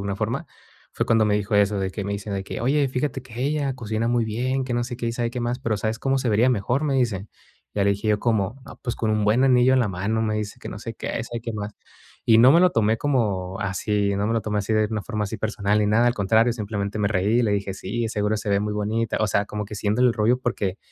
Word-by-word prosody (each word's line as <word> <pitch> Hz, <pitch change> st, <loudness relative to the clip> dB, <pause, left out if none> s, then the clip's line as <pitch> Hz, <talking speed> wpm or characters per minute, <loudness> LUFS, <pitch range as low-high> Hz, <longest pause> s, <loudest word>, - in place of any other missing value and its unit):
alguna 100 Hz, 0 st, -3 dB
forma, 110 Hz, +5 st, -2 dB, 0.5 s
fue -, -, -1 dB
cuando 115 Hz, -1 st, +4 dB
me 105 Hz, -1 st, +2 dB
dijo 105 Hz, 0 st, -1 dB
eso, 100 Hz, 0 st, +3 dB
de 95 Hz, -1 st, -1 dB
que 100 Hz, +1 st, -5 dB
me 100 Hz, -, -2 dB
dicen 100 Hz, 0 st, -4 dB
de 95 Hz, -, -3 dB
que: -, -, -6 dB
"Oye, 140 Hz, +3 st, +2 dB
fíjate 130 Hz, 0 st, -2 dB
que 125 Hz, -1 st, -9 dB
ella 140 Hz, -1 st, 0 dB
cocina 110 Hz, -1 st, -2 dB
muy 120 Hz, -1 st, +2 dB
bien, 130 Hz, +4 st, -1 dB
que 125 Hz, -2 st, -3 dB
no 120 Hz, 0 st, 0 dB
sé 120 Hz, -1 st, -6 dB
qué 120 Hz, -, -3 dB
y 115 Hz, -, -1 dB
sabe 120 Hz, -1 st, -1 dB
qué 125 Hz, -, -4 dB
más, 120 Hz, +2 st, -1 dB
pero 115 Hz, -4 st, -1 dB
¿sabes 110 Hz, +2 st, -2 dB
cómo 135 Hz, +2 st, +1 dB
se 130 Hz, -2 st, -1 dB
vería 115 Hz, +4 st, +4 dB
mejor?", 125 Hz, +6 st, 0 dB
me 140 Hz, -2 st, 0 dB
dice. 110 Hz, -6 st, 0 dB, 0.5 s
Ya 100 Hz, -1 st, +1 dB
le 100 Hz, -, +4 dB
dije 100 Hz, +2 st, -2 dB
yo: 105 Hz, -, +3 dB
"¿Cómo?", 110 Hz, +2 st, 0 dB
no, -, -, -11 dB
"pues 120 Hz, -, -2 dB
con 110 Hz, -, -1 dB
un 105 Hz, -1 st, +1 dB
buen 115 Hz, +6 st, +3 dB
anillo 125 Hz, 0 st, +5 dB
en 130 Hz, -, +4 dB
la 115 Hz, -, +1 dB
mano", 100 Hz, +5 st, -1 dB
me 110 Hz, -1 st, 0 dB
dice 105 Hz, -1 st, -4 dB
que -, -, -7 dB
no 100 Hz, -, -7 dB
sé 115 Hz, +1 st, -6 dB
qué, -, -, -7 dB
y -, -, -4 dB
sabe 120 Hz, -1 st, -5 dB
qué 115 Hz, -1 st, -4 dB
más. 105 Hz, 0 st, -5 dB, 0.5 s
Y 115 Hz, -1 st, +6 dB
no 125 Hz, +4 st, +8 dB
me 170 Hz, -, +6 dB
lo 180 Hz, 0 st, +5 dB
tomé 110 Hz, -3 st, +2 dB
como 100 Hz, -10 st, -1 dB
así 100 Hz, +1 st, 0 dB
no 100 Hz, +1 st, 0 dB
me 115 Hz, -, 0 dB
lo 115 Hz, -, +1 dB
tomé 105 Hz, -1 st, -3 dB
así 100 Hz, +2 st, -2 dB
de 110 Hz, 0 st, +3 dB
una 105 Hz, -2 st, -2 dB
forma 105 Hz, +2 st, -3 dB
así 105 Hz, +2 st, -4 dB
personal 105 Hz, -2 st, 0 dB
ni 105 Hz, -, +2 dB
nada, 110 Hz, +3 st, +3 dB
al 120 Hz, -, +2 dB
contrario, 110 Hz, +3 st, +3 dB
simplemente 105 Hz, -2 st, -3 dB
me 100 Hz, -1 st, +1 dB
reí, 105 Hz, +4 st, +2 dB
y -, -, +2 dB
le 110 Hz, -, +1 dB
dije: 100 Hz, -1 st, -1 dB
"Sí, 110 Hz, +4 st, -3 dB
seguro 105 Hz, 0 st, 0 dB
se 105 Hz, -, -5 dB
ve 100 Hz, 0 st, +2 dB
muy 105 Hz, 0 st, -2 dB
bonita". 110 Hz, +2 st, -1 dB
O 110 Hz, -, +3 dB
sea, 100 Hz, +1 st, +1 dB
como 105 Hz, 0 st, -4 dB
que 105 Hz, -, -8 dB
haciéndole 105 Hz, +5 st, +2 dB
el 115 Hz, -, 0 dB
rollo 120 Hz, +3 st, +2 dB
porque 105 Hz, -6 st, -2 dB
110 Hz, 290 wpm, -24 LUFS, 105-120 Hz, 0.5 s, no